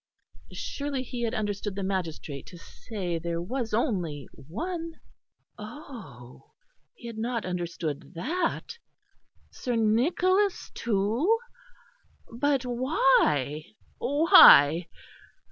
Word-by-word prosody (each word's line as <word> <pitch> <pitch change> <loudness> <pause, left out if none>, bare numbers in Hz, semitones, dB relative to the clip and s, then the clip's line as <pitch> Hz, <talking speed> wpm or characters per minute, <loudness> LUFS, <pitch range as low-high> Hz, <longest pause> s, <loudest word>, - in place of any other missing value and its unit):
Surely 280 -2 -4
he 245 -1 -6
had 235 +1 -1
understood 205 -2 -3
the 200 - -3
magistrate 165 -7 -4
to 175 - -11
say 175 -1 -5
there 170 0 -3
was 230 +6 -3
only 180 - -1
one? 330 - -6 0.6
Oh! 210 - -11 0.4
he 430 - -15
had 230 -2 -7
not 230 -1 -2
understood 175 -3 -4
that. 335 - -2 0.7
Sir 245 -2 -3
Nicholas 350 - +1
too? 235 - +1 1.0
But 270 +1 0
why, 235 - +2 0.3
why? 240 - +7
220 Hz, 95 wpm, -27 LUFS, 175-275 Hz, 1.0 s, why